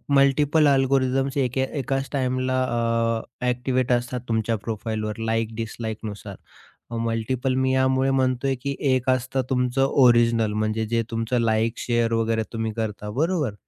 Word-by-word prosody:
Multiple 145 +2 +4
algorithms 135 0 +2
एकाच 135 +1 -2
टाईमला 130 -1 0 0.8
अ, - - +1
activate 125 0 0
असतात 125 0 0
तुमच्या 115 0 0
प्रोफाइलवर 110 -1 -3
लाइक 115 0 -1
डिसलाइकनुसार. 110 -3 -6 0.7
मल्टिपल 115 +3 -1
मी 130 0 +1
यामुळे 130 0 +2
म्हणतोय, 130 0 +1
की 140 +2 -4 0.2
एक 130 0 +1
असतं 130 +1 0
तुमचं 125 0 +1
ओरिजिनल 120 -5 +4
म्हणजे 110 +1 -1
जे 115 +1 0
तुमचं 115 +2 -1
लाइक, 115 0 +1
शेअर 120 -1 0
वगैरे 115 0 +1
तुम्ही 115 -1 -2
करता 105 -1 -4
बरोबर, 150 - 0
125 Hz, 125 wpm, -24 LUFS, 115-130 Hz, 0.8 s, मल्टिपल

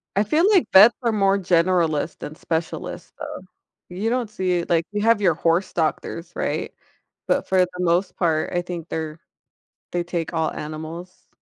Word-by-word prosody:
I 200 - +3
feel 320 - +3
like 380 -5 +4
vets 210 +5 +8
are 230 - +2
more 200 -2 +2
generalist 170 -4 +1
than 150 - -7
specialist 160 0 -4
though. 300 -6 -6 0.5
You 195 +6 -2
don't 245 -3 -1
see 185 -4 0
it 170 - -7
like, 165 -1 +2
you 205 - -1
have 225 -1 +4
your 180 -5 +3
horse 170 +4 +1
doctors, 165 +1 -2
right? - - -3 0.5
But - - +1
for 190 -1 +2
the 180 - +2
most 180 +2 +1
part, 160 -3 0
I 175 - +1
think 175 -2 -7
they're 160 0 -4 0.7
they 175 -1 -1
take 170 -1 -4
all 160 -1 0
animals. 160 +4 -8
175 Hz, 175 wpm, -23 LUFS, 165-200 Hz, 0.7 s, vets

